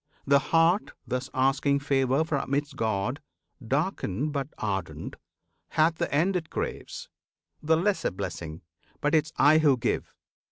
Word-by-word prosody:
The 140 0 +5
heart 165 +5 +3
thus 125 +1 -3
asking 135 +2 +2
favour 135 0 +2
from 140 -3 -1
its 145 0 -2
God, 115 +2 -1 0.4
Darkened 145 - -1
but 140 -2 -2
ardent, 95 -4 -3 0.5
hath 160 +1 +2
the - - -2
end 170 +7 +2
it 170 -3 -2
craves, - - -5 0.5
The 160 +1 +3
lesser 195 +4 +1
blessing 85 -2 -6 0.4
but 150 -1 +1
'tis 160 0 +2
I 155 +2 +6
who 145 -4 +4
give! 120 - -2
145 Hz, 135 wpm, -27 LUFS, 130-160 Hz, 0.5 s, I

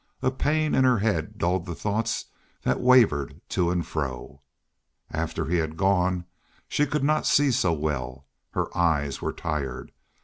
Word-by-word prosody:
A 130 - +3
pain 155 +3 0
in 130 - +4
her 125 -2 +4
head 100 -7 -1
dulled 90 0 0
the 85 - -4
thoughts 110 +4 -1 0.4
that - - +1
wavered 115 - +4
to 90 -2 +1
and 90 -1 0
fro. 70 -2 -5 0.7
After 80 0 -2
he 90 +2 +1
had 80 -1 -2
gone 90 -2 +2 0.4
she 150 - +1
could 150 0 -1
not 155 +2 +2
see 145 -1 +4
so 115 -8 +2
well. 70 -4 -3 0.3
Her - - -2
eyes 80 -5 +1
were - - -1
tired. 70 -5 -4
85 Hz, 160 wpm, -26 LUFS, 75-115 Hz, 0.7 s, in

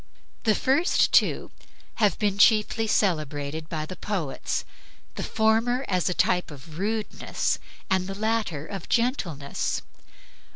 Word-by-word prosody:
The 215 -2 +4
first 285 +7 +3
two - - +3 0.5
have 210 -4 +3
been 200 -2 0
chiefly 220 +1 +4
celebrated 155 -5 0
by 155 -2 -3
the 185 - -7
poets, 180 -9 -3 0.5
the - - -5
former 230 +4 +2
as 185 -2 0
the 180 - 0
type 180 0 +2
of 155 +2 -11
rudeness, 215 +2 -1 0.3
the 190 +1 0
latter 215 -8 -1
of 195 -1 -7
gentleness. 180 - -1
195 Hz, 120 wpm, -26 LUFS, 160-220 Hz, 0.5 s, The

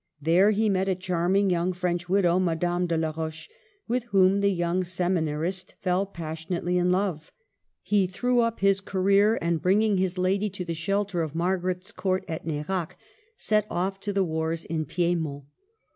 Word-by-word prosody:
There 170 +7 +4
he 215 +1 +2
met 190 -1 +1
a 190 - +1
charming 185 +2 +1
young 175 +1 +1
French 175 -1 -2
widow, 185 -2 +3
Madame 175 0 0
de 165 -1 0
la 160 -1 0
Roche, 160 0 -5 0.4
with 240 +1 -1
whom 195 -3 +3
the 200 - +3
young 175 0 0
seminarist 175 0 -2
fell 185 +1 0
passionately 170 0 -4
in 180 0 +2
love. 180 -4 -1 0.5
He 200 -3 +2
threw 245 +7 0
up 230 -3 0
his 195 0 +3
career, 200 +3 +3
and 170 -2 0
bringing 205 +2 +3
his 185 0 0
lady 195 +3 +1
to 185 -1 -6
the 170 - -3
shelter 195 +2 -1
of 160 -1 -4
Margaret's 180 +1 -1
Court 185 -1 -1
at 160 0 -5
Nerac, 160 +3 -3 0.4
set 210 -1 +1
off 190 +2 -2
to 205 +1 -3
the 195 -1 +1
wars 160 -1 -2
in 160 -1 -2
Piedmont. 165 -5 -1
180 Hz, 170 wpm, -26 LUFS, 170-195 Hz, 0.5 s, There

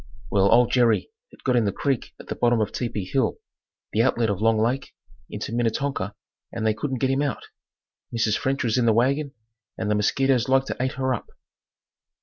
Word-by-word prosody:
Well 100 0 +3
old 120 +1 +5
Jerry 120 - +2 0.2
had - - -19
got 130 -2 +2
in 120 -3 +3
the 100 - +1
creek 135 +3 -2
at - - -11
the - - -4
bottom 120 -1 +2
of 110 - 0
Tepee 115 -6 -3
hill, 130 +7 0 0.6
the 110 - +3
outlet 115 -3 +2
of 100 0 -3
Long 115 0 +3
Lake 125 +5 -1 0.3
into - - -5
Minnetonka 120 -3 -1 0.4
and 115 - -3
they 110 - +3
couldn't 130 +3 -3
get 130 +2 +1
him 135 +1 +1
out. 140 -5 -3 0.6
Mrs. 115 -2 +1
French 135 +1 -1
was 115 +1 +1
in 120 - +2
the 110 - +5
wagon 135 +5 +1 0.4
and 105 -1 -1
the - - +3
mosquitoes 130 +4 +2
like 135 0 +4
to - - -4
ate 130 0 0
her 130 0 0
up. 120 - -5
120 Hz, 200 wpm, -24 LUFS, 110-135 Hz, 0.6 s, old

